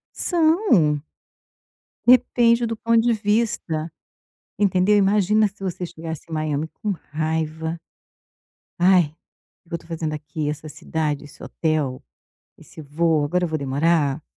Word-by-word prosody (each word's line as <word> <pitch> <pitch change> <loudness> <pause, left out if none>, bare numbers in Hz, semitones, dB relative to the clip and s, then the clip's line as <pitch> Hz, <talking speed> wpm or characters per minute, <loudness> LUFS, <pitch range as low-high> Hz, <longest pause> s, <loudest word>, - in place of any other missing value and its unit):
São. 315 - +3 1.0
Depende 240 -1 +4
do 225 0 -3
ponto 230 +1 +2
de 240 - +4
vista, 205 -7 -1 0.7
entendeu. 200 0 +3
Imagina 205 +1 +3
se 200 0 -18
você 185 -1 -3
chegasse 165 -2 -7
em - - -11
Miami 155 -1 -2
com 210 -2 -2 0.2
raiva. 160 +1 -2 1.0
Ai, 180 -5 +4 0.5
o - - -26
que 170 - -7
eu - - -1
tô - - -19
fazendo 160 -2 -3
aqui, 150 0 -4
essa 150 +1 -5
cidade, 150 -1 -3
esse 145 - -14
hotel, 155 -5 -2 0.5
esse - - -14
voo, 155 +1 +1
agora 180 +5 0
eu - - -1
vou 160 -1 -2
demorar 145 +1 +1
165 Hz, 135 wpm, -22 LUFS, 155-205 Hz, 1.0 s, Depende